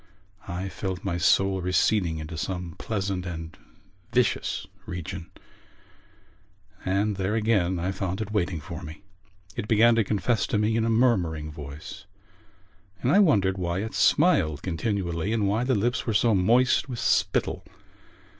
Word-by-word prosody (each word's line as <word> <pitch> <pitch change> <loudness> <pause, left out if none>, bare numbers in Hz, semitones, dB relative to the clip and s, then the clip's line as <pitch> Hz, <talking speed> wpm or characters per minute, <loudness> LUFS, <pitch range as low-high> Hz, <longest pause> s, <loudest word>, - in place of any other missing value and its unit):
I 90 +1 -4
felt 95 -1 -5
my 90 -4 -2
soul 95 +1 +3
receding 90 -1 +1
into 80 +1 -6
some 90 0 -4
pleasant 100 -4 -2
and 80 -2 -6 0.6
vicious 125 -1 0 0.2
region; 90 -1 -6 1.5
and 100 +2 0
there 95 +3 -1
again 105 -5 +1
I 90 +2 -1
found 95 0 -3
it 110 -1 -4
waiting 90 -5 0
for - - -8
me. 80 +5 -10 0.5
It 105 - -4
began 115 +2 +5
to 115 -1 +3
confess 105 +3 0
to - - 0
me 105 +1 +1
in 115 0 +1
a - - +1
murmuring 90 -11 +1
voice 75 +6 -9 1.0
and 125 - +2
I 200 - +6
wondered 100 - +3
why 90 +2 -1
it 110 - -6
smiled 95 - +3
continually 90 0 -2
and 105 -3 +1
why 110 +4 +1
the 130 0 +1
lips 120 +5 0
were 110 - 0
so 115 +2 +4
moist 120 +8 +3
with 125 - -4
spittle. - - +1
95 Hz, 150 wpm, -26 LUFS, 85-110 Hz, 1.5 s, I